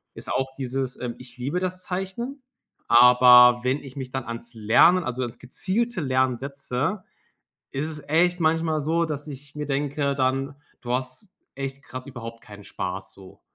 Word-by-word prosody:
ist -, -, -7 dB
auch 135 Hz, 0 st, -1 dB
dieses, 130 Hz, 0 st, -3 dB
ähm: 120 Hz, -1 st, -3 dB
„Ich 125 Hz, 0 st, -10 dB
liebe 140 Hz, +8 st, -2 dB
das 185 Hz, 0 st, -3 dB
Zeichnen”, 195 Hz, +9 st, -4 dB, 0.5 s
aber 125 Hz, 0 st, +8 dB
wenn 130 Hz, +3 st, +1 dB
ich 135 Hz, 0 st, -11 dB
mich 130 Hz, -2 st, -6 dB
dann 130 Hz, -2 st, -3 dB
ans 115 Hz, +1 st, -7 dB
Lernen 120 Hz, +12 st, +5 dB
also, 125 Hz, -2 st, -3 dB
ans 120 Hz, -, -6 dB
gezielte 195 Hz, -, -2 dB
Lernen, 130 Hz, -3 st, +1 dB
setze, 140 Hz, +7 st, -3 dB, 0.7 s
ist 140 Hz, +3 st, -2 dB
es 150 Hz, -2 st, -6 dB
echt 175 Hz, +3 st, +3 dB
manchmal 160 Hz, -1 st, +1 dB
so, 165 Hz, +3 st, +1 dB
dass 150 Hz, -2 st, -5 dB
ich 140 Hz, 0 st, -10 dB
mir 150 Hz, -1 st, -4 dB
denke 140 Hz, 0 st, -1 dB
dann: 135 Hz, +1 st, 0 dB, 0.3 s
„Du 120 Hz, -, -3 dB
hast 130 Hz, -, -4 dB, 0.2 s
echt 135 Hz, 0 st, -5 dB
grad 130 Hz, 0 st, -8 dB
überhaupt 115 Hz, -3 st, -8 dB
keinen 105 Hz, -2 st, -12 dB
Spaß”, -, -, -5 dB
so, 95 Hz, -1 st, -15 dB
135 Hz, 170 wpm, -25 LUFS, 125-160 Hz, 0.7 s, aber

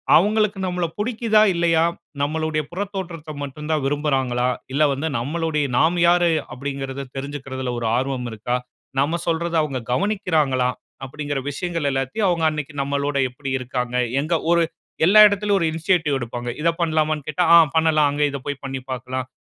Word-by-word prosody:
அவுங்களுக்கு 210 Hz, +3 st, +3 dB
நம்மள 180 Hz, -1 st, -1 dB
புடிக்கிதா? 220 Hz, -1 st, +2 dB
இல்லயா? 170 Hz, -1 st, +2 dB, 0.4 s
நம்மளுடைய 155 Hz, +1 st, 0 dB
புறத்தோற்றத்த 180 Hz, -4 st, -5 dB
மட்டும் 145 Hz, +2 st, -7 dB
தான் 155 Hz, -3 st, +1 dB
விரும்புறாங்களா? 135 Hz, -4 st, 0 dB, 0.3 s
இல்ல 150 Hz, +3 st, +3 dB
வந்து 140 Hz, +4 st, -2 dB
நம்மளுடைய 150 Hz, +3 st, -1 dB
நாம் 170 Hz, +3 st, +3 dB
யாரு? 175 Hz, 0 st, +4 dB, 0.2 s
அப்டீங்கிறத 135 Hz, 0 st, -5 dB
தெரிஞ்சிக்கிறதுல 135 Hz, -2 st, -5 dB
ஒரு 120 Hz, -, -3 dB
ஆர்வம் 130 Hz, -1 st, -2 dB
இருக்கா? 110 Hz, +3 st, -2 dB, 0.4 s
நம்ம 155 Hz, +5 st, +1 dB
சொல்றத 170 Hz, 0 st, 0 dB
அவுங்க 140 Hz, -4 st, -2 dB
கவனிக்கிறாங்களா? 155 Hz, -8 st, +1 dB, 0.4 s
அப்டீங்கிற 145 Hz, +1 st, -4 dB
விஷயங்கள் 165 Hz, 0 st, -2 dB
எல்லாத்தையும் 135 Hz, -, -1 dB
அவுங்க 170 Hz, -2 st, 0 dB
அன்றைக்கு 150 Hz, -1 st, -5 dB
நம்மளோட 140 Hz, +1 st, -1 dB
எப்பிடி 135 Hz, +2 st, -6 dB
இருக்காங்க? 125 Hz, -1 st, -3 dB, 0.3 s
எங்க 155 Hz, +4 st, -2 dB, 0.2 s
ஒரு 170 Hz, 0 st, +4 dB, 0.4 s
எல்லா 200 Hz, +5 st, +6 dB
இடத்திலேயும் 205 Hz, 0 st, +1 dB
ஒரு 165 Hz, -, +1 dB
இனிஷியேட்டிவ் 160 Hz, -3 st, +1 dB
எடுப்பாங்க. 120 Hz, 0 st, -5 dB
இத 170 Hz, -, +3 dB
பண்லாமான்னு 155 Hz, -3 st, 0 dB
கேட்டா, 155 Hz, +4 st, 0 dB
ஆ -, -, +10 dB, 0.2 s
பண்ணலாம். 155 Hz, -2 st, +4 dB
அங்க 145 Hz, +1 st, 0 dB
இத 140 Hz, -, -3 dB
போய் 145 Hz, -1 st, -4 dB
பண்ணி 135 Hz, 0 st, -4 dB
பார்க்கலாம். 130 Hz, 0 st, -4 dB
150 Hz, 150 wpm, -22 LUFS, 135-170 Hz, 0.4 s, ஆ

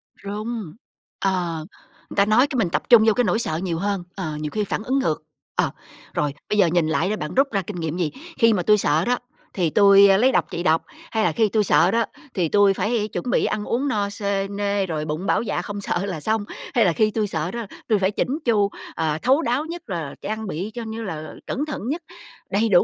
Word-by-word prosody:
Run, 210 Hz, -2 st, -5 dB, 0.5 s
ờ, 175 Hz, -5 st, -1 dB, 0.4 s
người -, -, -8 dB
ta 200 Hz, 0 st, +4 dB
nói 235 Hz, +6 st, +4 dB
cái 265 Hz, -, -3 dB
mình 195 Hz, -7 st, +2 dB
tập -, -, -1 dB
trung 235 Hz, -3 st, +8 dB
vô 220 Hz, -, +5 dB
cái 245 Hz, -, +2 dB
nỗi 210 Hz, +2 st, +1 dB
sợ 160 Hz, -8 st, -1 dB
nhiều 170 Hz, -3 st, -2 dB
hơn, 200 Hz, -2 st, -1 dB
ờ, 160 Hz, -6 st, -4 dB
nhiều 150 Hz, -, -3 dB
khi 210 Hz, -1 st, -1 dB
phản 210 Hz, -, -3 dB
ứng 265 Hz, +3 st, +1 dB
ngược. 155 Hz, -, -1 dB, 0.3 s
Ờ, -, -, +1 dB, 0.4 s
rồi, 145 Hz, -2 st, 0 dB, 0.2 s
bây 210 Hz, -, +1 dB
giờ 190 Hz, -4 st, +5 dB
nhìn 165 Hz, -1 st, +2 dB
lại 160 Hz, +4 st, +1 dB
đó 215 Hz, -, 0 dB
bạn 150 Hz, -6 st, -5 dB
rút 275 Hz, +1 st, +4 dB
ra 200 Hz, -2 st, +1 dB
kinh 190 Hz, +2 st, -7 dB
nghiệm 160 Hz, +1 st, -3 dB
gì? 165 Hz, -4 st, 0 dB, 0.3 s
Khi 230 Hz, -3 st, +5 dB
mà 180 Hz, -4 st, 0 dB
tui 210 Hz, +2 st, +5 dB
sợ 155 Hz, -2 st, +2 dB
đó, 245 Hz, 0 st, +2 dB, 0.4 s
thì 175 Hz, -4 st, +1 dB
tui, 200 Hz, +2 st, +7 dB
a, 195 Hz, 0 st, +5 dB
lấy 255 Hz, +5 st, +4 dB
độc -, -, +2 dB
trị 175 Hz, -, -3 dB
độc? 160 Hz, -1 st, +3 dB, 0.3 s
Hay 220 Hz, -1 st, +1 dB
là -, -, +3 dB
khi 220 Hz, -3 st, +2 dB
tui 215 Hz, 0 st, +2 dB
sợ 180 Hz, -1 st, +4 dB
đó, 230 Hz, -1 st, +2 dB, 0.3 s
thì 170 Hz, -4 st, 0 dB
tui 200 Hz, -1 st, +5 dB
phải 210 Hz, +3 st, 0 dB
chuẩn 200 Hz, +4 st, -4 dB
bị -, -, +2 dB
ăn 210 Hz, -1 st, -1 dB
uống 260 Hz, +5 st, 0 dB
no 205 Hz, -5 st, 0 dB
xê 200 Hz, -1 st, -1 dB
nê, 200 Hz, -1 st, -1 dB
rồi 155 Hz, -3 st, -3 dB
bụng 155 Hz, +5 st, -3 dB
bảo -, -, +2 dB
dạ 200 Hz, -6 st, -2 dB
không 205 Hz, +1 st, -6 dB
sợ 190 Hz, 0 st, -1 dB
là 180 Hz, -6 st, -4 dB
xong? 215 Hz, +3 st, 0 dB, 0.3 s
Hay 235 Hz, -5 st, +4 dB
là 170 Hz, -, +3 dB
khi 215 Hz, +3 st, +2 dB
tui 215 Hz, -1 st, 0 dB
sợ 160 Hz, 0 st, -2 dB
đó, 235 Hz, -2 st, -4 dB, 0.2 s
tui 215 Hz, -4 st, +3 dB
phải 190 Hz, +1 st, +2 dB
chỉn -, -, -1 dB, 0.2 s
chu, 205 Hz, -4 st, +3 dB, 0.3 s
ờ, 155 Hz, -1 st, 0 dB
thấu 270 Hz, +6 st, +3 dB
đáo, 265 Hz, +3 st, 0 dB
nhất 335 Hz, -7 st, -8 dB
là 165 Hz, -6 st, -4 dB
trang 220 Hz, 0 st, -4 dB
bị 190 Hz, +5 st, -4 dB
cho, 240 Hz, -1 st, -5 dB
như 225 Hz, +1 st, -5 dB
là, 155 Hz, -5 st, -6 dB
cẩn 290 Hz, +4 st, -1 dB
thận 300 Hz, -, -5 dB
nhất, 325 Hz, +6 st, -2 dB, 0.5 s
đầy 215 Hz, +3 st, +2 dB
đủ 175 Hz, -3 st, +6 dB
200 Hz, 250 wpm, -23 LUFS, 175-220 Hz, 0.5 s, trung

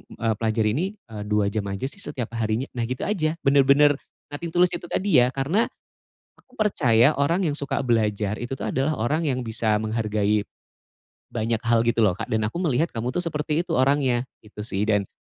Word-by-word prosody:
eee, 115 Hz, -1 st, 0 dB
pelajari 110 Hz, -1 st, +1 dB
ini, 150 Hz, +11 st, 0 dB, 0.3 s
eee, 105 Hz, -2 st, -5 dB
2 105 Hz, -1 st, +1 dB
jam 100 Hz, -1 st, -2 dB
aja 100 Hz, +2 st, -5 dB
sih 140 Hz, +9 st, -4 dB
setiap 135 Hz, -, -4 dB
harinya," 110 Hz, +2 st, 0 dB
nah 120 Hz, -2 st, -3 dB
gitu 125 Hz, +1 st, -4 dB
aja, 165 Hz, -6 st, 0 dB
bener-bener 140 Hz, +1 st, +5 dB, 0.4 s
nothing 155 Hz, +4 st, -5 dB
to -, -, +1 dB
lose 180 Hz, -, +3 dB
itu 175 Hz, -, -5 dB
tadi 190 Hz, -5 st, +2 dB
ya, 125 Hz, +1 st, +4 dB
karena, 155 Hz, +12 st, +1 dB, 0.7 s
aku 255 Hz, -, -27 dB
percaya 145 Hz, -, +3 dB
orang 165 Hz, +7 st, +2 dB
yang 150 Hz, -4 st, -1 dB
suka 140 Hz, -2 st, -2 dB
belajar, 110 Hz, -4 st, 0 dB
itu 120 Hz, +2 st, -5 dB
tuh 135 Hz, -, -4 dB
adalah 135 Hz, +4 st, 0 dB
orang 155 Hz, +8 st, 0 dB
yang 130 Hz, -3 st, 0 dB
bisa 110 Hz, -2 st, 0 dB
menghargai 105 Hz, -2 st, 0 dB, 0.9 s
banyak 115 Hz, 0 st, -1 dB
hal 115 Hz, -1 st, +3 dB
gitu 120 Hz, -1 st, +3 dB
loh, 100 Hz, -4 st, +4 dB
Kak, -, -, -4 dB
dan 110 Hz, 0 st, 0 dB
aku 110 Hz, +11 st, -3 dB
melihat 160 Hz, -1 st, +1 dB
kamu 115 Hz, +1 st, -2 dB
tuh 180 Hz, -, 0 dB
seperti 155 Hz, 0 st, -1 dB
itu -, -, -3 dB
orangnya, 130 Hz, -2 st, +2 dB, 0.2 s
gitu 105 Hz, 0 st, -15 dB
sih. 105 Hz, -1 st, -1 dB
Dan 105 Hz, -3 st, +1 dB
125 Hz, 195 wpm, -24 LUFS, 110-150 Hz, 0.9 s, bener-bener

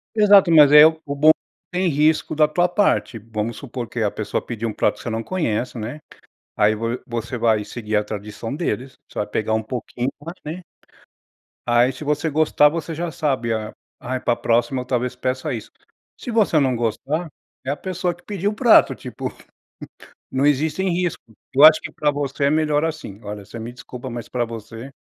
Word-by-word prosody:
Exato, 205 Hz, -4 st, +6 dB
mas 150 Hz, -3 st, +8 dB
aí 150 Hz, 0 st, +10 dB
é 150 Hz, -, +10 dB
o 160 Hz, -, +4 dB, 0.2 s
bom 155 Hz, +2 st, +6 dB
que 180 Hz, +2 st, -3 dB
é -, -, +1 dB
sem 185 Hz, -, +2 dB
risco 155 Hz, +1 st, +2 dB
da 155 Hz, 0 st, +5 dB
tua 175 Hz, +4 st, +1 dB
parte. 180 Hz, -, +1 dB
Vamos 110 Hz, +1 st, -4 dB
supor 125 Hz, -3 st, -6 dB
que 120 Hz, -, -5 dB
a 105 Hz, -, +1 dB
pessoa 110 Hz, -, -3 dB
pediu 115 Hz, -1 st, -4 dB
um -, -, -3 dB
prato 105 Hz, -, +1 dB
que -, -, -12 dB
você -, -, -5 dB
não 115 Hz, 0 st, -2 dB
conhece, 125 Hz, -8 st, -2 dB
né, 120 Hz, +8 st, -6 dB, 0.6 s
aí, 105 Hz, +1 st, +4 dB
vo 115 Hz, +2 st, -2 dB
você 120 Hz, -1 st, -4 dB
vai 110 Hz, -3 st, +2 dB
seguir 110 Hz, -1 st, -4 dB
a 105 Hz, -, +2 dB
tradição 105 Hz, +3 st, -6 dB
deles, 135 Hz, -5 st, -3 dB
você -, -, -10 dB
vai 105 Hz, -, 0 dB
pegar 110 Hz, +1 st, -1 dB
um 110 Hz, -, 0 dB
pouquinho 120 Hz, +1 st, -4 dB
mais 165 Hz, +4 st, -8 dB
né 165 Hz, +4 st, -6 dB, 1.0 s
Aí 120 Hz, +2 st, +3 dB
se 130 Hz, -, -11 dB
você 150 Hz, +2 st, 0 dB
gostar 150 Hz, -1 st, +4 dB
você 165 Hz, +1 st, -4 dB
já 170 Hz, +2 st, -3 dB
sabe, 130 Hz, -6 st, -1 dB
a 110 Hz, -1 st, -4 dB, 0.3 s
ai 130 Hz, +1 st, -3 dB
pra 120 Hz, -, +1 dB
próxima 120 Hz, +3 st, +1 dB
eu -, -, -9 dB
talvez 125 Hz, 0 st, -1 dB
peça 130 Hz, +1 st, -2 dB
isso. -, -, -7 dB, 0.5 s
Se 245 Hz, -, -6 dB
você 215 Hz, -8 st, +3 dB
não 135 Hz, -3 st, +2 dB
gostar, 135 Hz, +8 st, -2 dB, 0.4 s
é 130 Hz, -, -2 dB
a 145 Hz, -, -1 dB
pessoa 180 Hz, 0 st, -2 dB
que 175 Hz, -, -22 dB
pediu 200 Hz, -1 st, -2 dB
o -, -, -5 dB
prato 235 Hz, +1 st, +5 dB
tipo, 125 Hz, +1 st, -6 dB, 1.0 s
não 130 Hz, +2 st, +1 dB
existem 155 Hz, +6 st, +1 dB
risco. 175 Hz, -1 st, -1 dB, 0.3 s
Eu 140 Hz, -, +5 dB
acho 155 Hz, 0 st, +9 dB
que -, -, -7 dB
pra 150 Hz, -1 st, 0 dB
você 140 Hz, 0 st, -2 dB
é -, -, +4 dB
melhor 155 Hz, -1 st, +2 dB
assim. 155 Hz, -11 st, -5 dB
Olha 105 Hz, 0 st, -7 dB
você 115 Hz, -, -10 dB
me 115 Hz, +2 st, -7 dB
desculpa 125 Hz, +1 st, -9 dB
mas 120 Hz, -1 st, -7 dB
pra 120 Hz, -1 st, -1 dB
você... 115 Hz, +3 st, -9 dB
130 Hz, 205 wpm, -21 LUFS, 115-155 Hz, 1.0 s, aí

